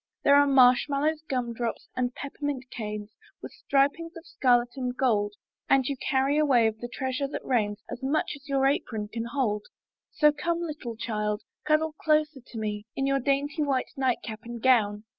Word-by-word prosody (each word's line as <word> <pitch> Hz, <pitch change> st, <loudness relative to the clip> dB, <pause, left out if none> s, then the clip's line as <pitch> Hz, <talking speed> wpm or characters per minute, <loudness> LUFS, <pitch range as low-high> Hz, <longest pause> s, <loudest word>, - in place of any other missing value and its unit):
There 280 Hz, -, +5 dB
are 285 Hz, 0 st, +6 dB
marshmallows, 275 Hz, +4 st, +4 dB
gumdrops, 240 Hz, -2 st, -2 dB
and 250 Hz, -1 st, -1 dB
peppermint 285 Hz, -2 st, -4 dB
canes 210 Hz, -2 st, -5 dB, 0.3 s
With -, -, -9 dB
stripings 285 Hz, +5 st, 0 dB
of 335 Hz, -, -12 dB
scarlet 245 Hz, -2 st, +2 dB
or 255 Hz, -2 st, -2 dB
gold, 210 Hz, -6 st, +1 dB, 0.3 s
And 270 Hz, -1 st, +4 dB
you 280 Hz, -, -1 dB
carry 270 Hz, +2 st, +1 dB
away 265 Hz, -6 st, +4 dB
of 220 Hz, 0 st, 0 dB
the 240 Hz, -, -5 dB
treasure 260 Hz, +2 st, -2 dB
that 275 Hz, -, -6 dB
rains, 210 Hz, -4 st, 0 dB
As 245 Hz, -, -7 dB
much 280 Hz, +4 st, 0 dB
as 280 Hz, 0 st, -15 dB
your 270 Hz, -1 st, +2 dB
apron 225 Hz, -6 st, -1 dB
can 230 Hz, +1 st, -4 dB
hold: 235 Hz, -4 st, -1 dB, 0.4 s
So 300 Hz, -1 st, +4 dB
come, 335 Hz, +3 st, -2 dB
little 295 Hz, -8 st, -5 dB
child, 210 Hz, -2 st, -2 dB, 0.2 s
cuddle 310 Hz, +1 st, +2 dB
closer 305 Hz, -3 st, +1 dB
to 240 Hz, -, -11 dB
me 210 Hz, -1 st, -4 dB
In 270 Hz, -, 0 dB
your 275 Hz, 0 st, +2 dB
dainty 280 Hz, +4 st, 0 dB
white 275 Hz, -3 st, 0 dB
nightcap 245 Hz, -4 st, -1 dB
and 235 Hz, 0 st, -7 dB
gown. 215 Hz, -4 st, +3 dB
260 Hz, 175 wpm, -27 LUFS, 230-285 Hz, 0.4 s, are